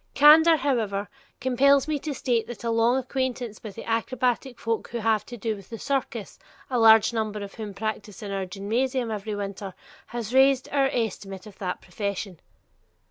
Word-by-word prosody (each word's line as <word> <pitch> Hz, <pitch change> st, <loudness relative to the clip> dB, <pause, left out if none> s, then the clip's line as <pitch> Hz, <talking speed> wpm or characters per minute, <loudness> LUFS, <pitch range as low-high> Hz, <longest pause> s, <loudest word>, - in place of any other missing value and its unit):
Candor, 315 Hz, +3 st, +8 dB
however, 225 Hz, -8 st, -1 dB, 0.3 s
compels 270 Hz, +2 st, +4 dB
me 305 Hz, -2 st, -1 dB
to 295 Hz, 0 st, -4 dB
state 240 Hz, -4 st, 0 dB
that 240 Hz, -2 st, -8 dB
a 230 Hz, -, 0 dB
long 230 Hz, +2 st, +3 dB
acquaintance 255 Hz, -3 st, -3 dB
with 215 Hz, -3 st, -8 dB
the -, -, -7 dB
acrobatic 245 Hz, +2 st, -1 dB
folk 225 Hz, -1 st, -2 dB
who 240 Hz, -, -5 dB
have 220 Hz, -2 st, +1 dB
to 240 Hz, -, -8 dB
do 220 Hz, 0 st, -2 dB
with 195 Hz, -, -13 dB
the 230 Hz, -, -6 dB
circus, 240 Hz, -5 st, -3 dB, 0.3 s
a 250 Hz, -, +1 dB
large 225 Hz, 0 st, +7 dB
number 215 Hz, -2 st, -2 dB
of 200 Hz, -, -8 dB
whom 210 Hz, -3 st, -7 dB
practice 215 Hz, -1 st, -5 dB
in 200 Hz, -, -5 dB
our 195 Hz, -1 st, -2 dB
gymnasium 230 Hz, +6 st, -1 dB
every 210 Hz, 0 st, -3 dB
winter, 200 Hz, -1 st, -5 dB, 0.3 s
has 235 Hz, -1 st, -5 dB
raised 265 Hz, 0 st, +5 dB
our 275 Hz, -1 st, +3 dB
estimate 195 Hz, -5 st, -3 dB
of 210 Hz, -2 st, -13 dB
that 180 Hz, -2 st, -3 dB
profession. 195 Hz, -1 st, -4 dB
225 Hz, 180 wpm, -26 LUFS, 205-255 Hz, 0.3 s, Candor